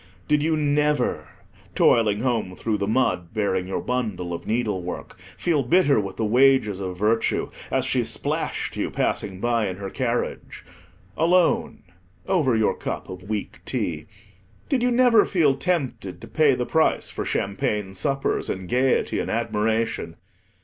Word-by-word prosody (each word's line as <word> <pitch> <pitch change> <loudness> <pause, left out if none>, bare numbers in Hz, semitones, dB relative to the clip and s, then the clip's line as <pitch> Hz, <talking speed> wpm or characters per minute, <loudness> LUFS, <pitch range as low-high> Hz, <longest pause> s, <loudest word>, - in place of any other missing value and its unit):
Did 150 -1 +3
you 160 +1 +1
never, 150 -2 +1 0.5
toiling 110 -2 +3
home 115 -7 -1
through 110 0 -2
the 100 - -1
mud, 110 -6 0
bearing 95 -4 0
your 95 - -2
bundle 105 -9 -2
of 85 - -6
needlework, 105 -8 -3 0.2
feel 165 -5 +1
bitter 140 0 +3
with 100 -2 -5
the 110 - 0
wages 120 -3 +4
of 90 -2 -4
virtue, 110 +3 +1 0.2
as - - 0
she - - +1
splashed - - -2
you, - - -2
passing 95 -3 -2
by 115 -1 +1
in 95 - -4
her 95 0 -6
carriage? 120 -2 -3 0.5
Alone, 175 +2 +2 0.4
over 145 -10 +2
your 110 -1 +2
cup - - -5
of 95 +1 -9
weak 105 -2 -4
tea, - - -3 0.6
did 270 -4 +1
you 250 - +3
never 245 -3 +5
feel 155 -7 +2
tempted 135 - -2
to - - -10
pay 150 -4 +3
the 125 - -2
price 160 +4 +1
for - - -4
champagne 100 0 -2
suppers, 135 +8 -1
and 95 -1 -4
gaiety, 130 +5 +1
and - - -3
admiration? 110 -5 -1
115 Hz, 150 wpm, -24 LUFS, 100-145 Hz, 0.6 s, never